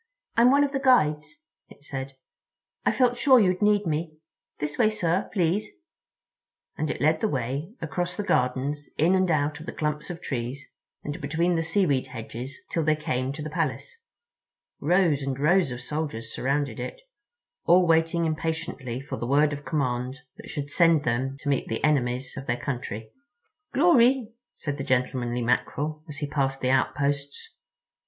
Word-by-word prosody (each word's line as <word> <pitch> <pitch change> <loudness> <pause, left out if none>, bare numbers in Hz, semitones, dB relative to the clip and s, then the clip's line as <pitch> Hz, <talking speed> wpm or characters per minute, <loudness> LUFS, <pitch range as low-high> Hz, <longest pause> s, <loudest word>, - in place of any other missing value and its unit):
"I'm 235 +2 +6
one 280 +2 +5
of 285 - 0
the 270 - -1
Guides," 250 - +2 0.3
it - - -16
said. 135 -1 -5 0.7
"I - - +3
felt 245 -2 +2
sure 260 0 +6
you'd 185 -3 +2
need 210 -1 +3
me. 155 0 -2 0.4
This 150 0 -4
way, 215 - +5
sir, 185 -3 0
please," 185 +2 +1 1.1
and 155 - -2
it - - -3
led 155 +2 +3
the 220 - +2
way 140 - -3
across 175 +4 -2
the 205 - -3
gardens 140 0 0
in 165 +5 +4
and 185 -1 +3
out 150 -2 +1
of 155 - -10
the - - -3
clumps 150 -1 -3
of 175 -1 -5
trees 130 -1 -4 0.4
and 145 - -5
between 165 +5 +1
the 165 - +1
seaweed 165 -5 +1
hedges 125 +3 -7
till 165 - 0
they 155 0 +3
came 130 -3 -2
to 150 +1 -6
the 155 - -4
Palace. 140 -5 -2 0.8
Rows 165 -2 +3
and 135 -1 -3
rows 170 +2 +3
of 125 0 -5
soldiers 135 -6 -4
surrounded 140 +2 -1
it, - - -5 0.7
all 180 +1 +6
waiting 165 0 +2
impatiently 155 -6 -3
for 135 - -6
the 120 - -4
word 145 +3 +3
of 145 0 -6
command 130 -3 -1 0.2
that - - -11
should 145 -1 -5
send 165 -3 +4
them 130 +2 -1
to - - -7
meet 140 -2 +1
the 115 - -3
enemies 130 -3 +1
of 135 - -7
their 120 - 0
country. 120 -5 -5 0.6
"Glory," 260 -7 +4 0.2
said 145 -2 -4
the - - -2
gentlemanly 125 -2 0
Mackerel, 145 +5 -1
as 145 - -6
he 145 -1 -3
passed 135 -2 -1
the 130 - +1
outposts. 140 +1 -1
150 Hz, 170 wpm, -26 LUFS, 135-170 Hz, 1.1 s, I'm